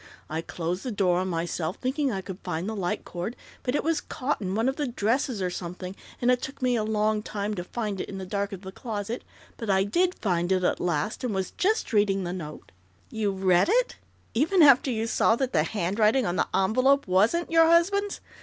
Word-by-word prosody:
I 160 Hz, +1 st, -1 dB
closed 175 Hz, +2 st, -3 dB
the 255 Hz, -, -4 dB
door 185 Hz, -4 st, +2 dB
on 185 Hz, -, -1 dB
myself, 170 Hz, -1 st, -2 dB
thinking 265 Hz, +1 st, -1 dB
I 195 Hz, -3 st, -2 dB
could 190 Hz, 0 st, -8 dB
find 175 Hz, -1 st, -3 dB
the 220 Hz, -, -3 dB
light 180 Hz, -4 st, -2 dB
cord, 180 Hz, +7 st, -5 dB, 0.3 s
but 250 Hz, +2 st, -1 dB
it -, -, 0 dB
was 330 Hz, 0 st, +1 dB
caught 265 Hz, -1 st, -3 dB
in 190 Hz, -1 st, -2 dB
one 225 Hz, +3 st, +1 dB
of 265 Hz, -, +1 dB
the 295 Hz, -2 st, -2 dB
dresses 235 Hz, -1 st, 0 dB
or 180 Hz, -, -1 dB
something, 180 Hz, +1 st, -6 dB, 0.2 s
and 245 Hz, +1 st, +3 dB
it 250 Hz, 0 st, +2 dB
took 270 Hz, -, -6 dB
me 250 Hz, -2 st, +2 dB
a 220 Hz, -, +1 dB
long 215 Hz, 0 st, +1 dB
time 210 Hz, 0 st, -3 dB
to 180 Hz, -4 st, -4 dB
find 205 Hz, -1 st, -3 dB
it -, -, -6 dB
in 195 Hz, -, -6 dB
the 190 Hz, -, -5 dB
dark 200 Hz, +2 st, -2 dB
of 195 Hz, -2 st, -7 dB
the 190 Hz, -1 st, -8 dB
closet, 220 Hz, +1 st, -5 dB, 0.3 s
but 225 Hz, -, -5 dB
I 190 Hz, 0 st, +4 dB
did 355 Hz, -, +1 dB
find 175 Hz, -3 st, 0 dB
it 185 Hz, -1 st, +2 dB
at -, -, +1 dB
last, 170 Hz, +5 st, -1 dB
and 235 Hz, -5 st, -1 dB
was 190 Hz, -1 st, -2 dB
just 415 Hz, -, 0 dB
reading 200 Hz, -2 st, +2 dB
the 175 Hz, 0 st, -3 dB
note 155 Hz, -5 st, -8 dB, 0.2 s
" -, -, -33 dB
"You 215 Hz, -2 st, 0 dB
read 190 Hz, -, +3 dB
it, -, -, +2 dB, 0.4 s
even 325 Hz, +9 st, +4 dB
after 275 Hz, -2 st, +6 dB
you 225 Hz, -2 st, -1 dB
saw 225 Hz, 0 st, +3 dB
that 260 Hz, +1 st, -2 dB
the 155 Hz, -, +4 dB
handwriting 210 Hz, -, +1 dB
on 175 Hz, -, -1 dB
the -, -, +1 dB
envelope 255 Hz, +8 st, +3 dB
wasn't 215 Hz, -, +2 dB
your 330 Hz, 0 st, +6 dB
husband's?" 395 Hz, +5 st, +2 dB
210 Hz, 230 wpm, -26 LUFS, 185-255 Hz, 0.4 s, after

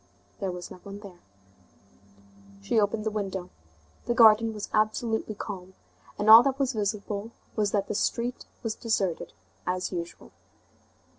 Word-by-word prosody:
There 195 Hz, -3 st, -2 dB
was 180 Hz, -1 st, -7 dB
no -, -, -9 dB
one 200 Hz, 0 st, -9 dB
there. 190 Hz, -4 st, -12 dB, 1.4 s
She 100 Hz, -, +2 dB
opened 210 Hz, +1 st, 0 dB
the 220 Hz, -, -1 dB
window. 195 Hz, -3 st, -4 dB, 0.6 s
The 240 Hz, -, +1 dB
garden 225 Hz, -1 st, +7 dB
was 210 Hz, -2 st, -6 dB
absolutely 215 Hz, 0 st, 0 dB
calm, 190 Hz, -3 st, -7 dB, 0.4 s
and 205 Hz, -, -2 dB
all 220 Hz, +2 st, +12 dB
that 270 Hz, +1 st, 0 dB
was 270 Hz, -2 st, 0 dB
visible 210 Hz, 0 st, -2 dB, 0.3 s
was 210 Hz, -2 st, +1 dB
that 200 Hz, -2 st, 0 dB
the -, -, -2 dB
street 235 Hz, +4 st, -1 dB, 0.2 s
was 225 Hz, -2 st, -1 dB
deserted 195 Hz, -8 st, -1 dB, 0.4 s
as 180 Hz, 0 st, -1 dB
usual. 170 Hz, -, -6 dB
210 Hz, 145 wpm, -27 LUFS, 195-225 Hz, 1.4 s, all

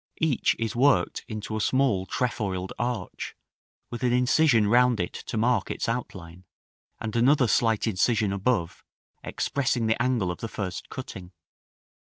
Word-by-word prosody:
Each 160 Hz, -6 st, +1 dB
is 115 Hz, 0 st, -3 dB
worked 135 Hz, +3 st, +2 dB
into 110 Hz, -1 st, -5 dB
a 110 Hz, -, -1 dB
small 125 Hz, -7 st, +1 dB
trefoiled 95 Hz, -5 st, -2 dB
arch, 120 Hz, -5 st, -4 dB, 0.6 s
with 120 Hz, -, -5 dB
an 125 Hz, -1 st, +2 dB
incision 125 Hz, -1 st, +4 dB
round 120 Hz, +1 st, +4 dB
it 90 Hz, -, -2 dB
to 115 Hz, -, -6 dB
mark 115 Hz, -2 st, +1 dB
its -, -, -3 dB
outline, 95 Hz, -7 st, -5 dB, 0.6 s
and 110 Hz, -1 st, -5 dB
another 125 Hz, +2 st, +4 dB
slight 115 Hz, +1 st, +2 dB
incision 105 Hz, -1 st, +1 dB
above, 100 Hz, -3 st, -1 dB, 0.4 s
expressing 125 Hz, -4 st, -1 dB
the 110 Hz, +1 st, +1 dB
angle 120 Hz, -7 st, +1 dB
of -, -, -7 dB
the 115 Hz, -, -4 dB
first 100 Hz, -4 st, -5 dB
cutting. 95 Hz, -9 st, -8 dB
115 Hz, 145 wpm, -26 LUFS, 100-125 Hz, 0.6 s, incision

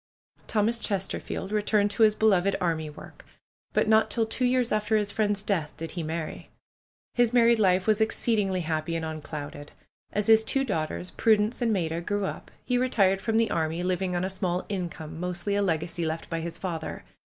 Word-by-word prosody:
Thomas 225 Hz, +2 st, +1 dB
Chesterfield 195 Hz, -1 st, -3 dB
returned 210 Hz, -1 st, +2 dB
to 230 Hz, -, -2 dB
his 215 Hz, -1 st, +6 dB
beloved 200 Hz, -3 st, +3 dB
army 160 Hz, -3 st, -1 dB
work. 150 Hz, -, -12 dB, 0.5 s
But -, -, +1 dB
not 220 Hz, 0 st, +4 dB
till 225 Hz, +1 st, +1 dB
two 235 Hz, +3 st, -1 dB
years 250 Hz, -1 st, +2 dB
after 215 Hz, +1 st, +2 dB
his 205 Hz, -1 st, 0 dB
friend's 205 Hz, -2 st, 0 dB
death 175 Hz, -8 st, -1 dB
did 165 Hz, 0 st, -6 dB
he 175 Hz, -, -4 dB
marry. 160 Hz, 0 st, -5 dB, 0.6 s
His 240 Hz, -1 st, +2 dB
married 235 Hz, -1 st, +5 dB
life 185 Hz, -2 st, +3 dB
was 215 Hz, 0 st, +2 dB
exceedingly 210 Hz, -4 st, +1 dB
happy 160 Hz, 0 st, -2 dB
and 165 Hz, -1 st, -2 dB
unclouded. 150 Hz, -2 st, -7 dB, 0.4 s
As 210 Hz, 0 st, -1 dB
his 220 Hz, 0 st, +6 dB
two 270 Hz, +4 st, +1 dB
daughters. 170 Hz, -3 st, -3 dB
Prudence 220 Hz, +2 st, +2 dB
and 235 Hz, -2 st, +2 dB
Maida, 170 Hz, -4 st, -1 dB
grew 205 Hz, +2 st, -1 dB
up, -, -, -6 dB, 0.2 s
he 250 Hz, -1 st, +1 dB
retired 195 Hz, -7 st, +2 dB
from 225 Hz, -1 st, 0 dB
the 225 Hz, 0 st, +2 dB
army, 165 Hz, +1 st, -1 dB
living 180 Hz, 0 st, -1 dB
on 175 Hz, -, 0 dB
a -, -, -2 dB
small 185 Hz, -2 st, -2 dB
income, 170 Hz, -5 st, -5 dB
mostly 180 Hz, +3 st, -2 dB
a 205 Hz, -, +2 dB
legacy 170 Hz, -2 st, -1 dB
left 160 Hz, +1 st, -3 dB
by 165 Hz, -, -1 dB
his 165 Hz, +1 st, -5 dB
father. 165 Hz, -4 st, -5 dB
195 Hz, 190 wpm, -27 LUFS, 170-220 Hz, 0.6 s, his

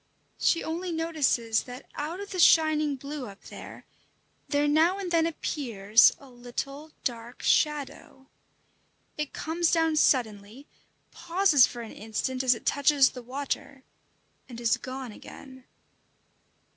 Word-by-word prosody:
She 335 Hz, -, +2 dB
only 345 Hz, +3 st, -4 dB
notices 300 Hz, -9 st, 0 dB
that 250 Hz, +1 st, -10 dB
out 315 Hz, +5 st, -5 dB
of 405 Hz, 0 st, -8 dB
the 370 Hz, -, -4 dB
shining 310 Hz, -3 st, +4 dB
blue 280 Hz, 0 st, -7 dB
up 200 Hz, 0 st, -12 dB
there, -, -, -11 dB, 0.6 s
there 290 Hz, 0 st, +1 dB
now 320 Hz, +6 st, +3 dB
and 380 Hz, -3 st, -5 dB
then 330 Hz, -1 st, +3 dB
appears 230 Hz, -10 st, +3 dB
a 280 Hz, -, -16 dB
little 260 Hz, +4 st, -7 dB
dark 235 Hz, 0 st, -5 dB
shadow. 290 Hz, -3 st, 0 dB, 0.9 s
It 300 Hz, -2 st, -4 dB
comes 330 Hz, +1 st, -1 dB
down 325 Hz, -1 st, +2 dB
suddenly, 225 Hz, -2 st, +1 dB, 0.5 s
pauses 340 Hz, -6 st, +3 dB
for 240 Hz, -, -8 dB
an 225 Hz, -, -9 dB
instant 225 Hz, +4 st, -3 dB
as 255 Hz, -2 st, +3 dB
it -, -, -12 dB
touches 285 Hz, -1 st, +4 dB
the 250 Hz, -, -9 dB
water, 265 Hz, +1 st, -5 dB, 0.7 s
and 235 Hz, -2 st, -8 dB
is 235 Hz, -1 st, +2 dB
gone 260 Hz, -1 st, -7 dB
again. 260 Hz, +4 st, -13 dB
275 Hz, 130 wpm, -27 LUFS, 245-315 Hz, 0.9 s, shining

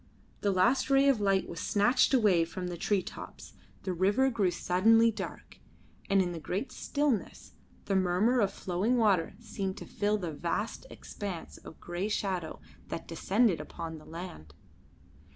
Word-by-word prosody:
The 205 Hz, -, 0 dB
last 200 Hz, +10 st, +2 dB
ray 275 Hz, 0 st, +5 dB
of 265 Hz, -6 st, +3 dB
light 195 Hz, -1 st, +2 dB
was 170 Hz, -, -7 dB
snatched 225 Hz, +4 st, +3 dB
away 210 Hz, -10 st, +4 dB
from 180 Hz, +2 st, -5 dB
the 175 Hz, -, -4 dB
tree 195 Hz, +2 st, 0 dB
tops, -, -, -10 dB, 0.3 s
the 185 Hz, -, -2 dB
river 205 Hz, +10 st, +2 dB
grew 205 Hz, -5 st, +2 dB
suddenly 225 Hz, +7 st, +4 dB
dark, 215 Hz, -, -8 dB, 0.5 s
and 195 Hz, -1 st, +4 dB
in 175 Hz, -, -3 dB
the 170 Hz, -, -5 dB
great 190 Hz, -, -3 dB
stillness 285 Hz, -7 st, -2 dB, 0.3 s
the 195 Hz, -, 0 dB
murmur 190 Hz, +7 st, +3 dB
of 200 Hz, -3 st, +3 dB
the -, -, -15 dB
flowing 195 Hz, +7 st, +1 dB
water 195 Hz, -6 st, +2 dB
seemed 195 Hz, -4 st, -4 dB
to -, -, -8 dB
fill 210 Hz, +1 st, 0 dB
the 175 Hz, -6 st, -4 dB
vast 190 Hz, -, -3 dB
expanse 195 Hz, -5 st, -7 dB
of -, -, -13 dB
grey 175 Hz, +3 st, -3 dB
shadow 190 Hz, -6 st, -2 dB, 0.3 s
that -, -, -6 dB
descended 195 Hz, +3 st, +1 dB
upon 160 Hz, -1 st, -7 dB
the 155 Hz, -, -16 dB
land. 160 Hz, -, -9 dB
195 Hz, 165 wpm, -30 LUFS, 175-225 Hz, 0.5 s, ray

